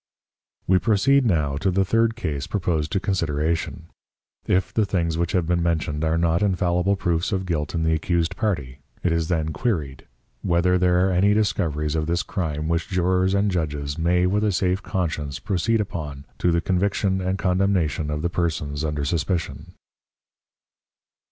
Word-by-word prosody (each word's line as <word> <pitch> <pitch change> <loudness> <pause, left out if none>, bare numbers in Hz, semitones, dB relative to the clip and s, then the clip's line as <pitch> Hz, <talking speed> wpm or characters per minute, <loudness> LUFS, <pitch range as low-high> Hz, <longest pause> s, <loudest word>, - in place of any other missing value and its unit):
We 95 0 +4
proceed 120 +6 +3
now 75 -8 +1
to 90 +6 0
the 95 +1 +2
third 115 +3 +2
Case 75 - -3
proposed 85 -6 -1
to 95 - +2
Consideration; 85 -3 -1 0.6
If 95 +1 +1
the 110 - +2
things 85 -5 0
which 85 +3 -1
have 90 -4 +2
been 85 +1 +1
mentioned 80 -3 -1
are 80 +1 +1
not 85 0 +2
infallible 90 -1 +1
Proofs 85 -3 -1
of 95 -2 -1
Guilt 80 -3 -2
in 80 - 0
the 80 0 +2
accused 85 +2 0
Party, 75 - -2 0.2
it 90 - +2
is 85 -1 0
then 80 -2 -1
Queried, 80 - -2 0.4
_Whether 90 +1 +2
there 90 0 +3
are - - 0
any 100 +3 +3
Discoveries 85 -8 0
of 80 -1 -1
this 85 +3 0
Crime, 75 -7 -3
which 85 0 0
Jurors 95 +1 +1
and 100 0 +2
Judges 75 -4 -2
may 90 +2 +2
with 100 +3 +1
a 105 - +2
safe 95 +1 0
Conscience 80 -6 -3
proceed 110 +4 0
upon 75 -8 -5
to 90 - +2
the 85 0 +2
Conviction 95 +1 0
and 95 +1 -1
Condemnation 90 -6 +1
of 75 +1 -3
the 85 - +1
Persons 75 -4 -2
under 75 -2 -2
Suspicion? 85 +2 -2
85 Hz, 170 wpm, -23 LUFS, 80-95 Hz, 0.6 s, We